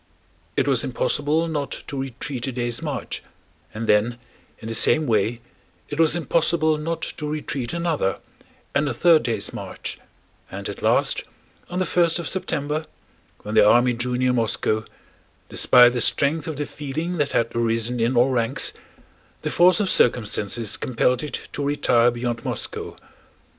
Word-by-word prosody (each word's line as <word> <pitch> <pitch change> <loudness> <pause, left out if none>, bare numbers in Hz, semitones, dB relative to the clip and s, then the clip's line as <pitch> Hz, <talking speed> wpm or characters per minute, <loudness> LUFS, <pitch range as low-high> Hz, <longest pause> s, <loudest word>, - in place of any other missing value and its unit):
It - - +2
was - - +3
impossible 165 - 0
not 145 -3 -4
to - - -7
retreat 130 0 -5
a - - -2
day's 120 -1 -2
march, - - -4 0.5
and 110 +1 -5
then 110 +3 +2 0.4
in 110 - -9
the 115 - -3
same 155 +7 +4
way 115 0 0 0.5
it 145 - -5
was 160 -1 +5
impossible 160 -1 +1
not 165 +2 -3
to 150 -1 -4
retreat 145 -4 -3
another 165 - -1 0.6
and 145 +1 +1
a 120 - -3
third 165 +4 +5
day's 115 - -2
march, - - -6 0.5
and - - -6
at - - -7
last, - - +2 0.5
on 180 - -4
the 185 - +1
first 170 -1 +2
of 170 - -4
September 155 -4 -2 0.6
when 105 - -5
the 110 -1 +6
army 120 +2 +4
drew 125 +1 -2
near 125 0 +2
Moscow—despite 115 +1 +1
the 120 - -1
strength 150 +6 +2
of 160 - -3
the 145 - -2
feeling 155 +6 -4
that 145 -2 0
had 115 0 0
arisen 115 +1 0
in 120 +2 +1
all 125 +3 +5
ranks—the 115 -3 -4
force 180 +3 +5
of 205 - +1
circumstances 110 - +1
compelled 125 0 +1
it 150 - -5
to 145 - -3
retire 135 -4 +3
beyond 120 -1 -3
Moscow. - - -4
130 Hz, 155 wpm, -23 LUFS, 120-155 Hz, 0.6 s, the